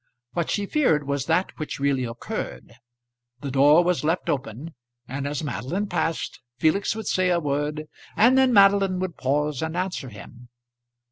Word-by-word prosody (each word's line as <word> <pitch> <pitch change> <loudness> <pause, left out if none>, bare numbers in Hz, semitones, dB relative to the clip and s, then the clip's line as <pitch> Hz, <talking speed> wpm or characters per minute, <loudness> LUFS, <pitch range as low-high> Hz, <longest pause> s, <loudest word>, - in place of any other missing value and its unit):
What 170 -2 -1
she 205 - 0
feared 160 - +1
was 140 -1 -2
that 170 +3 +1
which 155 - -5
really 135 -2 +1
occurred. 115 0 -6 0.7
The 140 - -4
door 145 +5 +6
was 175 -2 0
left 165 +4 0
open, 135 +4 -5 0.3
and 140 +2 -4
as 145 +1 -3
Madeline 150 - -3
passed 165 -4 -2 0.2
Felix 160 +9 +1
would 220 -1 -6
say 185 -1 +1
a 175 -1 +2
word, 150 0 -2 0.3
and 240 +4 +6
then 265 -1 +4
Madeline 195 -3 +5
would 185 -2 -3
pause 145 +1 -1
and 160 +1 -3
answer 180 -7 -3
him. 120 +3 -13
155 Hz, 160 wpm, -24 LUFS, 140-185 Hz, 0.7 s, door